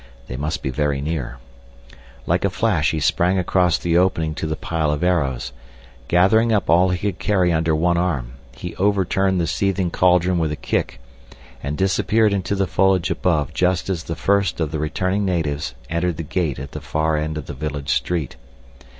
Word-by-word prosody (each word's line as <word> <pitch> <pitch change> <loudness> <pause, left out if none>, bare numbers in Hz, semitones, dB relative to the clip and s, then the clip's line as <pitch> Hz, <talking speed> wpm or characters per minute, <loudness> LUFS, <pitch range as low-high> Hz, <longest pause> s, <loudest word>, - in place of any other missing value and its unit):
They 60 - -5
must 75 +4 -3
be 65 - -1
very 75 0 0
near. 70 -5 -3 0.9
Like 85 +2 +1
a 100 - +2
flash 90 -5 +1
he 80 - -1
sprang 85 +6 +2
across 90 -1 +2
the 85 0 +2
opening 80 -4 +1
to 80 - -4
the 80 - -2
pile 80 -1 -1
of 75 +2 -2
arrows. 75 -9 0 0.5
Gathering 100 +6 +4
up 100 -7 +1
all 90 +3 +5
he 90 - 0
could 100 -1 -3
carry 90 -4 +2
under 80 0 +1
one 85 +2 +2
arm, 70 -10 -1 0.2
he - - -7
overturned 95 -1 +1
the 85 - +1
seething 95 -1 0
cauldron 90 0 +3
with 80 -2 0
a - - -2
kick, - - -2 0.6
and 70 +2 -3
disappeared 105 +3 +2
into 100 0 -1
the 95 0 +1
foliage 95 0 +2
above 80 -4 0
just 90 +3 +1
as 85 -4 -3
the 80 - -4
first 100 -2 +1
of 80 -3 -1
the 80 - -3
returning 95 +6 -1
natives 75 -9 -1
entered 85 +1 -1
the 80 - -4
gate 80 -2 -2
at 70 +1 -7
the - - -7
far 80 0 0
end 75 0 -2
of 75 - -5
the - - -7
village 70 0 -5
street. 80 -9 -2
85 Hz, 190 wpm, -21 LUFS, 75-95 Hz, 0.9 s, all